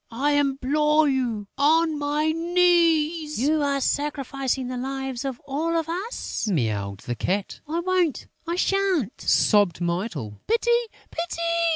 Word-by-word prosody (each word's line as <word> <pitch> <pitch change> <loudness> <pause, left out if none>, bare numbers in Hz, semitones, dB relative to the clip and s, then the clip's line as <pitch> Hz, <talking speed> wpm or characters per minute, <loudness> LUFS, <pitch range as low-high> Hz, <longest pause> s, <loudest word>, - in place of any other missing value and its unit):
I 270 +6 0
implore 290 +2 +2
you 240 -7 -1
on 315 +1 +3
my 295 +2 +1
knees!" 330 -3 +2
"You 300 +4 +2
are 280 -1 +1
sacrificing 275 -2 -1
the 255 - -4
lives 265 0 -4
of 265 -3 -4
all 320 +5 -1
of 325 -1 -1
us," 370 - -4
mewed 105 - -1
the 120 - -4
Cat. 185 - -2
"I 330 +3 -1
won't! 360 -4 0 0.2
I 340 - -1
sha'n't!" 370 - 0
sobbed 205 -7 +3
Mytyl. 170 - -3
"Pity! 465 +2 +2 0.4
Pity!" 335 0 -4
290 Hz, 135 wpm, -24 LUFS, 245-330 Hz, 0.4 s, on